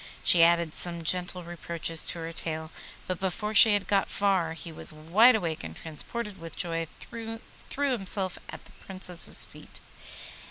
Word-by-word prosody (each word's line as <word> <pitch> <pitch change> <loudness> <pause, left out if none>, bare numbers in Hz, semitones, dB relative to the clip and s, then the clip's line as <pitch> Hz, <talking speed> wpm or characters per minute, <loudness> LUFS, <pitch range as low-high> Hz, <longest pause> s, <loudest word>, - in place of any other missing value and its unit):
She 170 - +5
added 170 -1 +4
some 170 -1 +1
gentle 180 +2 +1
reproaches 170 -1 -1
to - - -1
her 165 0 -5
tale, 160 -1 -3 0.3
but 185 -2 -3
before 210 +3 -2
she 215 0 +8
had 205 - -1
got 200 -1 +2
far 190 -5 +1
he 165 +1 -7
was 160 - -4
wide 180 +11 +5
awake, 170 -7 -2
and 80 -1 -7
transported 195 +6 -6
with 165 -1 -8
joy 165 -2 -1 0.2
threw 225 -1 -6 0.4
himself 200 -9 0
at - - -8
the - - -16
Princess's 185 -3 -4
feet. - - -13
175 Hz, 160 wpm, -28 LUFS, 165-200 Hz, 0.4 s, she